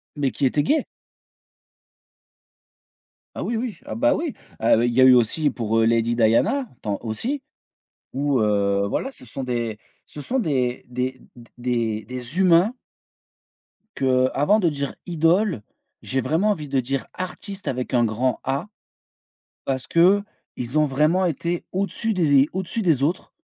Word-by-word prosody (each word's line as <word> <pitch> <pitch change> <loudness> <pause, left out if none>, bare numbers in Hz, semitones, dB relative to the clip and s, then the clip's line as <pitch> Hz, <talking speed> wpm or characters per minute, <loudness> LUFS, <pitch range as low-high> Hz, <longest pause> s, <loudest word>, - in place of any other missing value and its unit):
mais 140 -3 0
qui 140 - -1
était 145 +3 +2
gay. 300 - +1 2.5
Ah - - -4
oui 235 - -2
oui, 230 -2 -4
ah - - -5
bah 295 +5 +3
oui! 320 -4 -3 0.3
Heu, 115 0 +4
il 120 - 0
y 130 - +4
a - - +8
eu 130 -1 +8
aussi 125 +6 +2
pour, 115 -3 -1
heu, 115 - +4
Lady 115 +1 +2
Diana 200 - +2
tant 100 -1 -2
aussi, 230 - -3 0.7
où, 140 -1 0
heu, 100 -1 +1
voilà 265 - -2
ce 195 - -13
sont 130 +3 -6
des 120 -3 -2 0.3
ce - - -11
sont 255 - -1
des 130 - -1
des 125 +1 -3
d 120 -1 -15
des 115 -3 -1
des 125 - -4
humains 185 +4 +5 1.2
qu'avant 130 +8 +2
de 175 -5 +2
dire 140 -2 -3
idoles, 170 - +1 0.4
j'ai 130 0 -1
vraiment 160 - +1
envie 160 -8 -1
de 135 -1 +1
dire 130 +2 -2
artistes 190 +2 -6
avec 125 0 -3
un 120 -1 +4
grand 115 +2 0
A, 135 +7 -2 1.0
parce 130 -1 -2
qu'ils 175 - +1
ont 155 - +4
vraiment 155 +7 +2
été 170 +1 -2
au-dessus 200 +4 -1
des 145 -6 +4
au-dessus 190 +4 -2
des 160 -8 +2
autres 170 +5 -2
140 Hz, 155 wpm, -23 LUFS, 120-180 Hz, 2.5 s, a